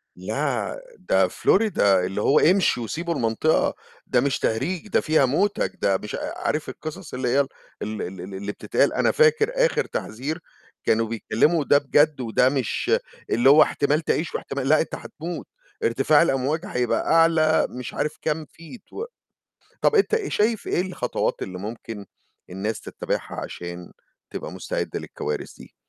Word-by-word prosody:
لأ، - - -2 0.2
ده - - +2
Florida 215 +1 +1
اللي 95 0 +3
هو 140 - +4
امشوا 180 -8 +3
وسيبوا 170 +8 -3
المنطقة 115 +5 +1 0.3
ده 125 - +3
مش 140 0 0
تهريج، 160 - -1
ده - - +2
فيها 155 -3 +3
موتك، 195 +11 +1
ده 95 -1 +3
مش 105 - -6
أ - - -3
أ - - -6
عارف 155 0 -1
القصص 155 +1 -8
اللي 125 0 -2
هي 135 +3 +3
ال 140 - -2 0.3
ال 105 0 -4
ال 90 0 -6
ال 95 +2 -8
اللي 100 +2 -4
بتتقال، - - +1
أنا - - +2
فاكر 460 0 +4
آخِر - - 0
تحذير 140 +9 -4 0.4
كانوا 115 +1 +2
بيكلموا 115 +8 +1
وده 145 0 +4
بجد 145 0 +2
وده 125 +2 +3
مش 130 -5 -1 0.4
اللي 120 +4 +4
هو 150 +2 +8
احتمال 145 +2 +1
تعيش 160 0 -1
واحتمال 135 -1 -3
لأ، 155 0 +5
أنت - - -4
هتموت، 170 +3 -7 0.4
ارتفاع 155 - +4
الأمواج 150 +2 0
هيبقى 125 - -1
أعلى 165 -1 +4
مش 125 -1 -7
عارف 150 +1 -2
كام 155 0 -1
feet 165 - -14
و 445 - -4 0.8
طَب 450 - +3
أنت 415 +1 +3
آآ 440 -3 +1
شايف 215 0 0
إيه 175 - +1
الخطوات 185 -1 -2
اللي 90 -1 -5
ممكن 110 0 -7 0.4
الناس 100 +4 -3
تتبعها - - -4
عشان 85 0 -8 0.4
تبقى - - -5
مستعدة - - -3
للكوارث 75 - -5
دي؟ - - -15
145 Hz, 160 wpm, -24 LUFS, 115-165 Hz, 0.8 s, هو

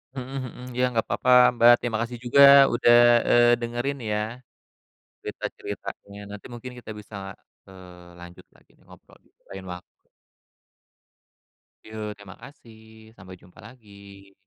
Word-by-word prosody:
Mhm 135 +1 -7
mhm. 125 0 -11
Ya 125 - +1
nggak 115 - -2
papa 125 - -2 0.3
Mbak. 120 +1 +7
Terima 120 -2 -3
kasih 120 +1 -5
juga 130 +3 +3 0.3
udah, 120 0 +3 0.4
eee, 120 0 +4
dengerin 120 +4 -4
ya 105 - -1 1.0
cerita-ceritanya. 100 0 -8
Nanti 105 - -11
mungkin 125 +1 -9
kita 115 - -11
bisa, 105 0 -12 0.5
eee, 90 -2 -15
lanjut 85 0 -14
lagi - - -29
nih - - -29
ngobrol - - -19
di - - -30 0.2
lain 95 -1 -10
waktu. 90 0 -15 1.8
Yok, 110 -1 -7
terima 100 -1 -14
kasih 110 -5 -17
sampai 95 0 -13
jumpa 90 0 -22
lagi. 100 -4 -17
110 Hz, 135 wpm, -24 LUFS, 100-120 Hz, 1.8 s, Mbak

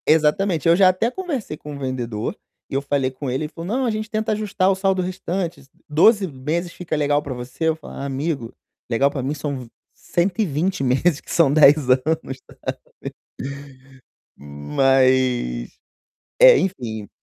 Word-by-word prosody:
Exatamente. 160 +2 +2
Eu 165 - +6
já 185 0 +6
até 200 +6 0
conversei 280 - -4
com 150 -1 -8
o - - -8
vendedor 120 -5 -3 0.3
e - - -10
eu 135 - +1
falei 140 -2 0
com 130 +1 -5
ele, 130 +4 -1
ele 150 - -8
falou: 165 +1 -7
"Não, 265 - 0
a 235 - +1
gente 215 0 -4
tenta 220 +1 -1
ajustar 205 -3 +1
o - - +1
saldo 190 -1 +1
restante, 180 -1 -3
s 135 - -20 0.2
12 195 +7 +4
meses 160 +5 -3
fica 175 -3 -4
legal 145 -1 +1
pra 140 - -5
você?" 125 +6 -5
Eu 160 - +1
falo: 160 - -12
"Amigo, 140 -2 -3 0.4
legal 135 +4 +2
pra 135 - -3
mim 135 +3 -1
são 145 -2 -4
v 125 - -10 0.3
120 180 -2 -1
meses, 135 +5 +2
que - - -11
são 155 -5 +4
10 145 -2 +6
anos, 135 +1 +1 0.6
sabe". - - -8 1.2
Mas 95 - +1 0.7
é, - - +9
enfim 115 - -4
150 Hz, 165 wpm, -21 LUFS, 130-185 Hz, 1.2 s, é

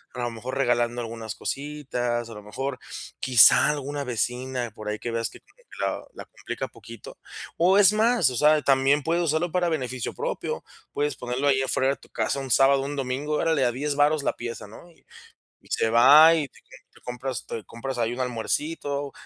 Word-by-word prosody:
a - - -6
lo 120 -1 -2
mejor 125 +4 -6
regalando 120 -2 +1
algunas 115 -1 -6
cositas, 130 -5 -3
a 115 - -10
lo 105 - -9
mejor 130 +5 -5 0.4
quizá 125 +2 +6
alguna 145 -1 -3
vecina, 125 0 -3
por 110 0 -10
ahí 105 - -2
que 120 - -4
veas 115 0 -2
que - - -14 0.4
la - - -2
la - - -10
complica - - -6
poquito. - - -13 0.4
O 185 +4 +4
es 205 0 +6
más, 225 - +3
o - - -5
sea, 150 +4 +4
también 135 +1 +3
puedes 170 +3 +1
usarlo 160 +2 0
para 180 0 +1
beneficio 130 -6 -3
propio, - - -4 0.3
puedes 145 -1 -1
ponerlo 125 +3 -2
ahí 135 -1 +3
afuera 130 0 +1
de 140 - -1
tu - - -20
casa - - -2
un 135 -1 -6
sábado 135 +2 +4
o - - -4
un 145 +1 -4
domingo, 135 +2 -3
órale 160 -2 +1
a 120 - +2
10 145 +4 -2
varos 145 +1 +2
la - - 0
pieza, 115 -2 -7
¿no? 110 +11 -14
Y 165 - -27 0.6
y - - -20
se 110 - +1
va 145 +8 +8
y 155 -4 -1
te - - -21 0.5
compras 125 -1 -5
te 115 - -5
compras 130 +3 -6
ahí 115 0 0
un 120 - -6
almuercito 140 +4 -2
135 Hz, 195 wpm, -25 LUFS, 120-150 Hz, 0.6 s, va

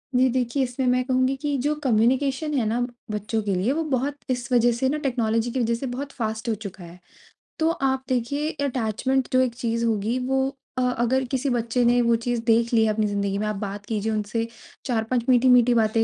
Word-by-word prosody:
जी 255 +1 +5
देखिए, 255 +2 0
इसमें 255 +1 -2
मैं 250 0 +3
कहूँगी 260 +1 +1
कि 290 0 -1
जो 295 +3 +1
कम्युनिकेशन 265 +5 +1
है 240 - +1
ना 225 +3 0 0.3
बच्चों 210 +1 -2
के 200 -2 0
लिए 190 +8 +1
वो 325 +2 -1
बहुत 275 +2 -1
इस 245 -1 -2
वजह 240 -1 +4
से 260 +3 0
ना 300 - 0
टेक्नोलॉजी 235 -4 0
की 260 - -2
वजह 235 -1 +1
से 235 - -5
बहुत 270 +3 -5
फ़ास्ट 220 -1 -3
हो - - +2
चुका 200 -3 -9
है। 170 +1 -12 0.6
तो 320 0 +3
आप 265 -5 0
देखिए 265 +5 -1 0.2
अटैचमेंट 255 +1 0
जो 255 - +5
एक 250 -2 0
चीज़ 230 -1 -1
होगी 225 +1 0
वो 265 0 +1 0.3
अ, - - +1
अगर 250 +1 +1
किसी 270 +1 0
बच्चे 240 0 0
ने 245 +1 +4
वो 235 -1 +3
चीज़ 235 0 -2
देख 230 0 +3
ली 225 -1 +5
है 215 - +2
अपनी 215 0 0
ज़िंदगी 200 -1 -1
में। 210 - -1
आप 210 - -2
बात 200 0 -5
कीजिए 220 0 -2
उनसे 215 +2 -2 0.4
चार-पाँच 235 0 0
मीठी-मीठी 250 -1 +5
बातें 225 -1 +2
240 Hz, 215 wpm, -24 LUFS, 220-260 Hz, 0.6 s, जी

